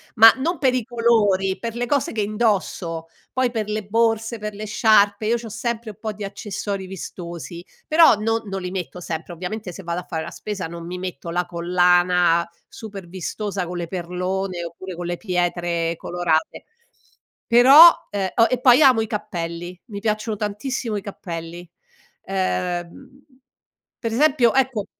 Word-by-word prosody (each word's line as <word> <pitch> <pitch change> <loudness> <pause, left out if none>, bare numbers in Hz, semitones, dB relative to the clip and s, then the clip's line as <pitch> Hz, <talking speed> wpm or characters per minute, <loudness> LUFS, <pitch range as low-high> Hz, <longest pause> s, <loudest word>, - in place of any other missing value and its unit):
Ma 225 0 +10
non 330 +6 -2
per 260 -3 +3
i 250 - 0
colori, 215 -5 +2
per 230 -1 -5
le 245 0 -2
cose 280 -1 0
che 220 - -2
indosso, 200 -6 -1 0.3
poi 255 -1 +1
per 220 -3 -3
le 215 0 -2
borse, 225 +1 +1
per 210 0 -5
le 210 +1 -6
sciarpe, 210 -2 +3
io 235 +2 +2
c'ho 230 -1 -8
sempre 230 +1 -4
un 205 - -18
po' 215 -1 -4
di 205 0 -8
accessori 200 -1 -5
vistosi, 175 -2 -8 0.2
però 320 -5 +6
non 225 +2 -1
non 195 -1 -4
li 180 0 -5
metto 180 -1 -5
sempre, 170 0 -5
ovviamente 180 +3 -5
se 195 - -9
vado 170 +1 -3
a - - -17
fare 160 -1 -3
la - - -7
spesa 205 -5 -5
non 170 0 -8
mi 180 +1 -6
metto 175 -3 -6
la 175 +1 0
collana 175 0 +3 0.2
super 200 -5 -9
vistosa 190 +2 -4
con 175 +1 -6
le 170 -1 -4
perlone, 180 +1 -3
oppure 180 +2 -8
con 175 +1 -6
le 175 0 -3
pietre 175 -3 -1
colorate; 170 -3 -1 0.8
però, 270 +8 +9 0.2
ehm, 195 -2 -1
o 230 -1 +5
e 255 - 0
poi 250 +2 +6
amo 260 -6 +6
i 220 - -2
cappelli, 175 -4 -5
mi 200 -2 -6
piacciono 215 0 -1
tantissimo 215 +3 -3
i - - -4
cappelli, 175 -3 -7 0.6
ehm, 185 +4 -3 0.8
per 230 - -2
esempio, 265 -3 +3
ecco 260 -6 +1
200 Hz, 170 wpm, -22 LUFS, 175-225 Hz, 0.8 s, Ma